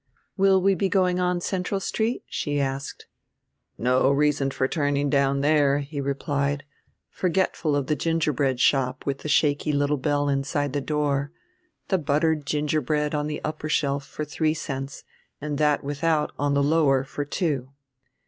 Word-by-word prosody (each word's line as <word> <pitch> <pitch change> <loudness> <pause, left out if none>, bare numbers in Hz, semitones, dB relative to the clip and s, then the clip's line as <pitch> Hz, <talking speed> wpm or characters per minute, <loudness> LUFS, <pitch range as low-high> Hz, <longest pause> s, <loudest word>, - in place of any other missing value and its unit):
"Will 195 -1 +4
we 195 +1 +3
be 190 +1 0
going 185 -2 +2
on 180 -1 0
Central 190 +2 -2
Street?" 220 +5 -1
she 145 -1 -2
asked. 135 0 -3 0.7
"No 125 +3 +3
reason 140 -1 +2
for 130 -1 0
turning 145 -2 0
down 140 -1 +2
there," 145 -1 +3
he 140 0 -5
replied, 140 0 -1 0.5
forgetful 180 -4 0
of 140 -2 0
the 150 - 0
gingerbread 150 -4 0
shop 130 -1 +2
with 140 -1 -2
the 150 - -6
shaky 150 +1 +2
little 145 0 +1
bell 145 +1 0
inside 140 0 -1
the 145 - -1
door, 145 -1 -1 0.6
the 190 - +2
buttered 150 0 +1
gingerbread 150 0 0
on 150 0 -1
the 150 0 -5
upper 155 0 -4
shelf 140 -2 0
for 150 +2 -6
three 155 +2 0
cents 135 -3 -5 0.4
and 145 0 -4
that 150 -1 +2
without 150 +2 0
on 145 0 +1
the 140 - +3
lower 140 -3 +3
for 145 +2 -4
two. 145 -4 -2
145 Hz, 160 wpm, -25 LUFS, 140-155 Hz, 0.7 s, Will